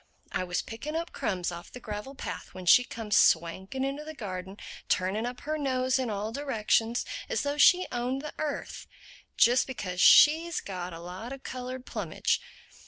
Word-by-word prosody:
I - - -1
was 180 0 -2
picking 285 +8 -6
up 335 +1 -3
crumbs 180 -2 -2
off 170 0 -9
the 250 - -9
gravel 215 +4 -6
path - - -7
when 185 -1 -8
she 250 +8 +7
comes 225 -4 -3
swanking 190 +10 +2
into 275 +2 -3
the 315 +1 -8
garden, 190 -4 -6 0.3
turning 195 +5 +1
up 245 0 -7
her 310 +1 -3
nose 260 -2 +1
in 255 -3 -1
all 210 +1 -3
directions, 235 -3 0 0.2
as 485 - 0
though 285 0 -2
she 360 +5 +6
owned 250 +3 -2
the 300 - -6
earth—just 270 -4 -1
because 185 -8 -4
she's 325 +3 +7
got 180 -2 -6
a 165 - -8
lot 185 +8 -7
of 270 -1 -8
colored 255 0 -6
plumage. - - -1
245 Hz, 170 wpm, -29 LUFS, 190-275 Hz, 0.3 s, she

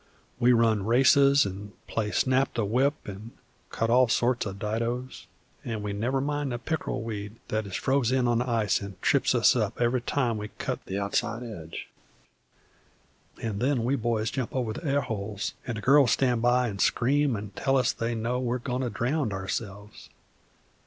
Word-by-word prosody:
We 125 0 +5
run 115 -4 +3
races 135 +4 +5
an' 100 +1 -7
play 105 -2 -2
snap 130 +4 +1
the 115 - 0
whip, 130 +8 +2
an' 105 +3 -8 0.4
cut 115 0 -1
all 125 +1 +5
sorts 120 0 +1
o' 100 - -4
didoes, 115 +5 -3 0.4
an' 110 -3 -4
we 105 -1 -3
never 120 +6 0
mind 145 0 -2
the 120 - -2
pick'rel 130 -2 -3
weed 105 -1 -5
that 110 -1 -1
is 95 - -6
froze 135 -3 +1
in 130 -1 +2
on 120 -1 +2
the 125 +1 -2
ice 115 -3 +1
an' 100 -1 -7
trips - - +3
us - - +5
up - - -1
every 120 +1 +1
time 120 -3 0
we 105 - -5
cut - - -3
the 95 - -3
outside 110 +4 -1
edge; 85 -9 -8 1.6
an' 105 -3 -2
then 130 -1 +1
we 130 +4 +1
boys 115 -3 -1
jump 130 -2 -4
over 120 -4 -1
the - - -7
airholes, 110 - -2
an' 120 - -2
the 110 - -5
girls 135 +1 +5
stan' 125 -3 +2
by 120 +1 +3
an' 100 -3 -5
scream 140 +4 +2
an' 105 -1 -6
tell 135 +6 +1
us 125 -2 +2
they 115 +1 -2
know 115 +3 -1
we're 125 0 -1
agoin' 125 0 -3
to 125 - -1
drownd 125 +1 -1
ourselves. 100 +2 -6
120 Hz, 185 wpm, -27 LUFS, 105-130 Hz, 1.6 s, We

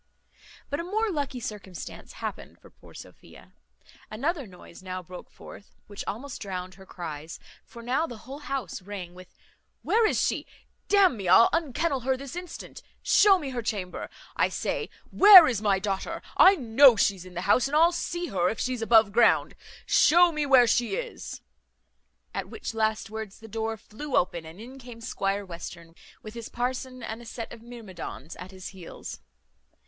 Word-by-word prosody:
But 285 - -1
a - - -2
more 425 +4 -1
lucky 285 -5 -3
circumstance 200 -6 -8
happened - - -7
for - - -18
poor - - -18
Sophia; - - -14 0.6
another 280 +5 -2
noise 180 -2 -14
now 185 -1 -6
broke 180 +1 -11
forth, 205 - -14
which 205 -1 -7
almost 255 +6 -6
drowned 185 -2 -5
her 190 +1 -16
cries; 160 -2 -7 0.3
for 235 - -13
now 265 +7 0
the 240 - -8
whole 275 +3 -8
house 275 - -4
rang 185 -2 -8
with, 185 0 -15 0.5
"Where 450 0 +3
is - - 0
she? - - -1 0.4
D 410 - +3
n 380 -9 +5
me, 195 -3 -5
I'll 190 +6 +7
unkennel 315 -2 0
her 260 +1 0
this 275 +2 -8
instant. 355 0 -8 0.2
Show 400 -2 +6
me 290 -6 -5
her 245 -2 -3
chamber, 200 -5 -4 0.3
I - - +2
say. - - -3 0.2
Where 390 -5 +10
is 230 -5 -1
my 200 -2 +2
daughter? 195 0 -3
I 390 - +7
know 255 -2 +6
she's 200 -3 +1
in 185 0 -13
the 175 - -3
house, 205 +7 +3
and 285 - -3
I'll 335 +2 +6
see 345 0 -3
her 180 -2 +1
if 225 - -4
she's 250 -2 -2
above 225 -2 +5
ground. 230 +2 +3 0.3
Show 345 +3 +5
me 300 -2 -2
where 260 -3 +7
she 240 - +1
is." - - -6 0.9
At - - -4
which 425 - -6
last 220 -1 -1
words 220 -3 -7
the 225 - -12
door 220 +1 -3
flew 250 +8 -6
open, 170 -2 0
and 165 +4 -12
in 255 +4 -10
came 245 -2 -11
Squire 200 -3 -2
Western, 170 -1 -9 0.3
with 215 - -9
his 235 -1 -8
parson 255 +1 -4
and 225 +2 -6
a - - -12
set 230 -1 -7
of 230 - -12
myrmidons 205 - -9
at 180 +1 -9
his 190 0 -9
heels. 185 -4 -9
225 Hz, 180 wpm, -27 LUFS, 190-275 Hz, 0.9 s, Where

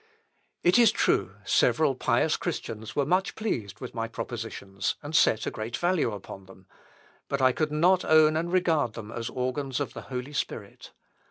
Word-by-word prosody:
It 180 +7 +5
is 235 -3 +7
true, - - +1
several - - +3
pious - - +1
Christians 110 0 -5
were 145 - +2
much 185 +6 +1
pleased 115 - -3
with 125 - -7
my 115 0 -2
Propositions, 100 -3 -4
and 145 +2 -5
set 110 - +4
a - - -2
great 110 +2 -4
value 175 -8 +1
upon 95 -1 -9
them, 95 0 -16 0.6
but 140 - -2
I 130 -1 +5
could 155 +3 -1
not 175 +5 +3
own 155 0 +5
and 170 +2 -1
regard 165 -10 +2
them 110 -1 -8
as 115 -1 -4
the - - -7
organs 130 +1 -2
of - - -3
the - - -7
Holy 130 +2 -5
Spirit. - - -5
135 Hz, 180 wpm, -27 LUFS, 115-160 Hz, 0.6 s, is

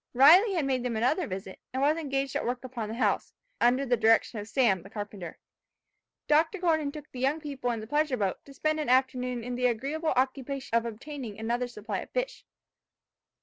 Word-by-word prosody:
Riley 355 - +7
had 320 -5 +1
made 260 -2 0
them 240 -2 -2
another 290 +9 +1
visit, 190 0 -6
and 260 - -3
was 290 +3 +3
engaged 275 -4 -2
at - - 0
work 245 +1 -2
upon 240 -4 -5
the 220 - -4
house, 255 - 0 0.3
under 255 +3 +3
the 245 -1 +3
direction 225 0 +3
of 205 - -7
Sam, 225 -7 +2
the 195 - -13
carpenter. 205 -5 -7 0.9
Dr. 315 +6 +3
Gordon 320 -5 +1
took 300 0 -10
the 255 - -8
young 275 +5 +1
people 280 -5 -4
in 230 -2 -2
the - - -7
pleasure 295 +1 +1
boat, 195 -4 -2
to 280 - -13
spend 310 +1 0
an 300 - -2
afternoon 250 -1 +1
in 250 +1 -4
the 250 0 +2
agreeable 280 +7 -1
occupation 265 0 -1
of 230 0 +2
obtaining 235 -1 -7
another 235 +3 -1
supply 210 -4 -5
of - - -8
fish. - - -3
255 Hz, 200 wpm, -28 LUFS, 230-290 Hz, 0.9 s, Riley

